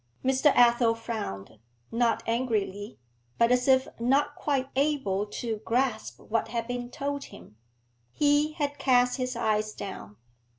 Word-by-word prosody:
Mr. 265 +3 +4
Athel 235 -1 +5
frowned, 210 - -6 0.3
not 230 0 +1
angrily, 220 -3 -2 0.4
but 235 +1 +3
as 250 +1 +2
if 260 -1 +4
not 270 +5 +2
quite 275 -3 -1
able 265 -9 0
to 220 +1 -4
grasp 230 +1 -1
what 225 0 -2
had 230 0 -3
been 245 0 -4
told 280 +2 -4
him. 105 - -14 0.6
He 295 - +2
had 290 -2 -3
cast 250 -1 +3
his 255 -1 -3
eyes 215 -2 0
down. 105 - -8
240 Hz, 135 wpm, -27 LUFS, 220-265 Hz, 0.6 s, Athel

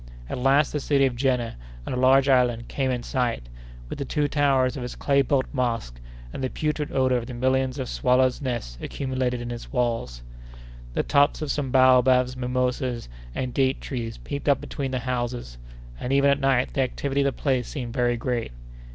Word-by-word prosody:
At - - -4
last 135 +3 +3
the 150 - 0
city 140 0 +2
of 130 -2 0
Jenné, 125 -2 0 0.3
on - - -4
a - - -1
large 130 +2 +4
island, 125 -3 +2
came 135 -2 -1
in 125 -2 -2
sight, 120 - -1 0.4
with 135 - -7
the - - -1
two 145 +2 0
towers 135 -3 +2
of 130 - -5
its 125 - -6
clay 140 -1 +2
built 135 0 +1
mosque, 115 - -2 0.3
and 135 - -5
the 130 - 0
putrid 150 0 -2
odor 130 -1 +2
of 120 -1 -4
the 125 - -7
millions 130 +1 +1
of 130 -2 -3
swallows' 125 +2 +2
nests 120 - -4
accumulated 130 -2 -2
in 120 0 -5
its 120 -1 -7
walls. 115 - -1 0.7
The - - +1
tops 145 +2 +2
of 145 - -2
some 145 -3 -2
baobabs, 130 -1 +5
mimosas, 125 - -2 0.3
and 125 -2 -3
date 135 0 +1
trees 115 -4 -5
peeped 140 0 -4
up 140 - +4
between 135 -2 -4
the 130 - -2
houses; 120 - -3 0.4
and, 125 - -3
even 140 +1 +4
at 140 - +1
night, 135 -2 +1
the 135 - +1
activity 140 +2 -1
of - - +1
the 140 - +2
place 130 -4 0
seemed 120 -5 -5
very 120 -1 +1
great. 120 - -2
130 Hz, 195 wpm, -25 LUFS, 125-135 Hz, 0.7 s, baobabs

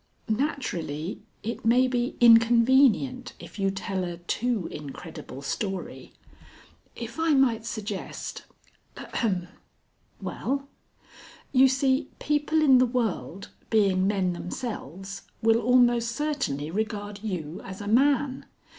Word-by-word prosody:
Naturally 205 - -2 0.2
it 230 +3 -4
may 245 +3 +4
be 245 -1 -1
inconvenient 240 +2 +5
if - - -11
you 195 0 +2
tell 195 -1 -3
a 175 -1 -4
too 215 +4 -1
incredible 145 -1 -8
story. 190 +6 -4 0.8
If 235 +6 -7
I 325 -2 +3
might 230 -4 +2
suggest 210 -4 -5 0.5
(ahem) 185 -7 -2 0.4
." - - -41
"Well?" 275 +1 -3 0.8
"You 265 0 +6
see, 265 +1 +1
people 300 +1 +1
in 265 -4 +7
the 255 - +4
world, 200 - -2 0.2
being 195 -4 +3
men 190 -3 +1
themselves, 195 - -6 0.2
will 225 +1 +4
almost 240 -1 +4
certainly 270 - -2
regard 205 0 -3
you 180 -4 -4
as 190 0 -8
a 205 - -6
man. 270 +3 +2
225 Hz, 115 wpm, -26 LUFS, 190-255 Hz, 0.8 s, in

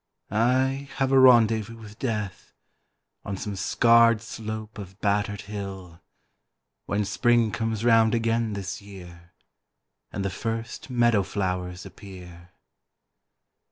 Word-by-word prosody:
I 130 +5 +1
have 135 -1 0
a 135 - +6
rendezvous 115 -3 +4
with 105 -2 -13
Death 105 -7 -4 0.7
On 100 - -5
some 100 +1 -5
scarred 115 +4 +4
slope 110 -1 -7
of 95 -1 -10
battered 100 0 0
hill, 95 -4 -8 0.9
When 105 +1 0
Spring 115 +2 +2
comes 115 0 -2
round 115 -1 +4
again 115 -1 0
this 100 0 -5
year 90 -4 -13 0.8
And 100 - -4
the 100 - -1
first 115 +5 -5
meadow 120 -4 +3
flowers 90 -2 -3
appear. 90 -3 -12
105 Hz, 115 wpm, -25 LUFS, 100-115 Hz, 0.9 s, a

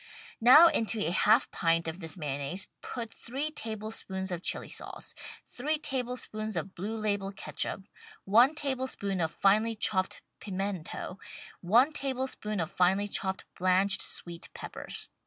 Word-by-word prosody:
Now 255 +8 +9
into 225 -7 +2
a 165 - 0
half 215 +7 +4
pint 165 0 +1
of 160 +3 -4
this 160 0 -1
mayonnaise 145 +4 -2
put 230 -3 -5
three 275 +6 -4
table 220 -6 -5
spoons 190 -3 -2
of 175 -1 -3
Chili - - -1
sauce; - - -5 0.3
three 300 +5 -1
tablespoons 245 -6 -3
of 190 - -3
Blue 210 +5 -4
Label 205 -2 -1
Ketchup; 195 0 -2 0.4
one 240 +9 +5
tablespoon 260 -10 -1
of 160 - +1
finely 215 +7 +2
chopped 190 -3 +1 0.2
pimento; 195 -2 -4 0.4
one 235 - +4
tablespoon 260 -7 -2
of 165 - -2
finely 190 +3 +2
chopped 190 -1 -2
blanched 185 +2 +3
sweet 170 -1 -4
peppers. - - -3
205 Hz, 140 wpm, -30 LUFS, 185-240 Hz, 0.4 s, Now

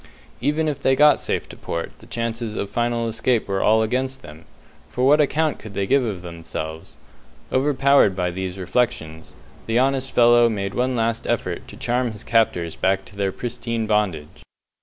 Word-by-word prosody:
Even 150 +4 +1
if 145 -2 -2
they 135 -1 +2
got 150 +2 +6
safe - - -2
to - - -10
port, 85 - -5
the - - -16
chances 115 -1 -3
of 100 - -4
final 120 -1 0
escape 115 +1 0
were 95 -1 -1
all 110 +1 +4
against 130 +3 -2
them, 75 +2 -12 0.4
for 125 - -1
what 150 +3 +6
account 155 +1 +1
could 105 -3 -11
they 100 0 0
give 135 +6 +3
of 100 -7 -4
themselves? 80 -2 -7 0.5
Overpowered 135 -5 +3
by 90 -1 -1
these 95 +1 -5
reflections, 90 -5 -2 0.3
the 115 +1 +1
honest 135 +1 +1
fellow 120 0 +5
made 100 -3 -3
one 125 +1 0
last 115 -1 -1
effort - - -2
to - - -11
charm 120 -1 -1
his 105 - -9
captors 90 -8 +1
back 95 0 0
to 100 - -16
their 100 -1 -1
pristine 115 0 -4
bondage. 100 -8 -1
115 Hz, 180 wpm, -22 LUFS, 95-125 Hz, 0.5 s, got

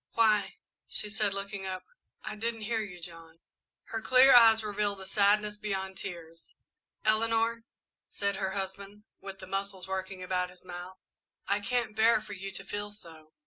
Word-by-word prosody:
"Why," 210 -4 +3 0.3
she 210 - -1
said, 210 -1 +1
looking 200 -1 -4
up, 185 -1 -4 0.4
"I - - -5
didn't 225 +1 -3
hear 225 +1 -1
you, 190 -4 -7
John." 165 -1 -11 0.5
Her 225 -1 -3
clear 260 +3 +7
eyes 225 -2 +8
revealed 205 -1 0
a 190 - -8
sadness 210 +1 +2
beyond 190 -2 -3
tears. 165 -4 -8 0.5
"Eleanor," 225 +1 +2 0.4
said 200 -1 0
her 190 -1 -2
husband, 200 +1 -5 0.2
with 195 0 -8
the 190 - -9
muscles 195 -1 -4
working 190 0 -4
about 180 0 -1
his 180 0 -18
mouth, 180 +1 -8 0.5
"I 200 +1 +2
can't 230 +1 -1
bear 220 +1 +5
for 210 -1 -9
you 195 0 -6
to 195 0 -7
feel 205 +1 -4
so." 160 -6 -14
200 Hz, 165 wpm, -30 LUFS, 190-215 Hz, 0.5 s, eyes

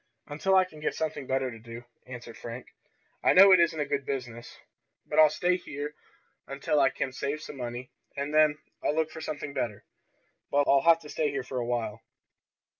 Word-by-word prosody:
"Until 175 +6 0
I 185 -1 +6
can 155 -4 -14
get 150 - -2
something 155 -4 -3
better 130 -1 0
to 115 - -10
do," 115 +1 -10 0.2
answered 120 -2 -9
Frank. 120 +2 -8 0.6
"I - - +5
know 195 +1 +9
it 185 - +8
isn't 170 -2 +2
a 145 - 0
good 140 -1 -2
business, 120 -4 -6 0.5
but 150 - 0
I'll 155 -1 +8
stay 175 +4 +1
here 145 -3 -6 0.5
until 140 +2 0
I 135 -1 +5
can 135 0 -4
save 140 +3 -3
some 145 - -9
money, 120 0 -6 0.3
and 140 +2 -3
then 155 -1 +4 0.3
I'll 150 - +1
look 160 0 0
for 160 - -8
something 150 -2 -5
better. 115 -6 -3 0.6
But 145 0 +3
I'll 140 0 +5
have 165 +2 +5
to 150 - -12
stay 150 0 0
here 140 -2 -3
for 125 0 -4
a 120 - -3
while." 115 -3 -2
140 Hz, 200 wpm, -28 LUFS, 125-155 Hz, 0.6 s, know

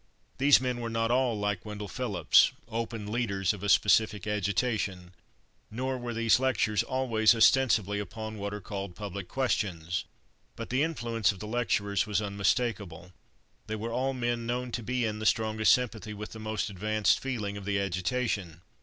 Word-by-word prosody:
These 140 +1 +6
men 125 -2 -2
were 115 - -3
not 115 0 0
all 125 -3 +2
like 105 -3 -2
Wendell 105 -1 -6
Phillips, 100 -7 +3
open 115 -2 -4
leaders 100 -5 0
of 100 - -9
a 100 - -2
specific 105 -1 +3
agitation, 105 -3 -1 0.6
nor 130 +4 -2
were 120 -1 -5
these 115 +1 +3
lectures 110 -5 +1
always 120 -4 +2
ostensibly 110 -4 +4
upon 110 +2 -6
what 100 0 -3
are 105 - -5
called 100 -2 -6
public 100 -2 -6
questions. 90 -10 -1 0.5
But - - -7
the 130 +2 +2
influence 120 -9 0
of 100 - -10
the 105 - -7
lecturers 105 -3 0
was 105 -1 +1
unmistakable. 100 -4 -1 0.5
They 110 - -3
were 115 +2 -4
all 135 +2 0
men 120 -1 -2
known 125 +1 -2
to 120 - -3
be 125 +2 -1
in 105 -1 -3
the 110 - -4
strongest 110 -1 +3
sympathy 110 -4 0
with 105 +1 -7
the 110 - -9
most 110 -1 -3
advanced 105 +2 +1
feeling 110 -7 -3
of 100 -1 -7
the 100 0 0
agitation. 95 -2 -2
110 Hz, 170 wpm, -29 LUFS, 100-120 Hz, 0.6 s, These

